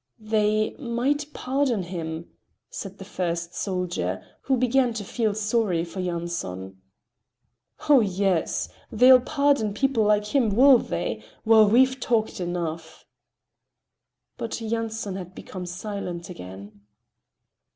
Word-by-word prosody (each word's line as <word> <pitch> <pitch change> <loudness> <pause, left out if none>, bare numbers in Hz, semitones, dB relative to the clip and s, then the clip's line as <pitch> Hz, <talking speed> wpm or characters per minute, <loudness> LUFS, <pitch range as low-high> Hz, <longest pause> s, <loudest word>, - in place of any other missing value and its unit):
"They 215 0 +1
might 280 +4 -1
pardon 260 -6 0
him," 165 -2 -5 0.4
said 195 0 -7
the 195 - -9
first 170 -3 -3
soldier, 180 -2 -2 0.2
who 265 -1 +1
began 250 0 +2
to 215 - -3
feel 215 0 -1
sorry 210 -5 0
for 175 +3 -8
Yanson. 170 - -4 1.1
"Oh, 290 -3 +7
yes! 195 -5 0 0.2
They'll 250 +3 +7
pardon 280 -7 +1
people 270 -2 +2
like 210 0 +1
him, 250 -5 +4
will 260 +1 +7
they? 90 - -3 0.2
Well, 220 -2 +6
we've 260 +4 +4
talked 225 -4 0
enough." 165 -2 -4 1.3
But 230 - -4
Yanson 225 -3 -3
had 180 -1 -8
become 180 -1 -7
silent 180 -2 -5
again. 100 - -10
210 Hz, 115 wpm, -25 LUFS, 175-235 Hz, 1.3 s, Oh